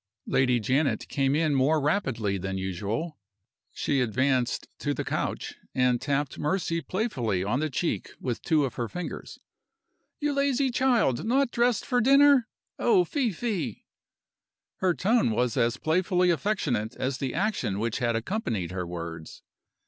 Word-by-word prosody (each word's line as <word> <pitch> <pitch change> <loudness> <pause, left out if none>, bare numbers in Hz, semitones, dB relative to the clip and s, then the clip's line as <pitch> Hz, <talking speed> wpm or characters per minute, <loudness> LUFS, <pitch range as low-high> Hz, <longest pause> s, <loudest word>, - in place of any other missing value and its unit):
Lady 125 -2 +2
Janet 135 +7 0
came 135 0 +1
in 155 -1 +2
more 140 +4 +3
rapidly 135 - 0
than 95 +1 -3
usual. 100 - -3 0.5
She 140 -2 0
advanced 125 +1 0
to - - -1
the - - -3
couch, - - -3 0.2
and 125 -2 +2
tapped 145 -1 -1
Mercy 165 +1 0
playfully 125 - -1
on 110 +7 0
the 155 +1 -1
cheek 165 +5 -2
with 120 -3 -3
two 155 -3 +2
of 130 - -4
her 120 - -1
fingers. 180 +8 -6 0.8
"You 295 -1 0
lazy 280 -1 +1
child! 240 - +2
Not 255 +3 +2
dressed 240 -1 +1
for 245 -1 +1
dinner? 275 -1 +6 0.3
Oh, 385 -5 +4
fie, 275 -8 0
fie!" 175 - -3 0.9
Her 185 -2 +1
tone 220 - +2
was 120 +1 0
as 115 +2 +1
playfully 180 +3 +2
affectionate 135 - -1
as 130 0 -2
the 130 -3 -3
action 185 - -1
which 115 +2 -1
had 120 -2 +1
accompanied 115 - -2
her 90 -2 -4
words. 85 -2 -7
140 Hz, 150 wpm, -27 LUFS, -, 0.9 s, dinner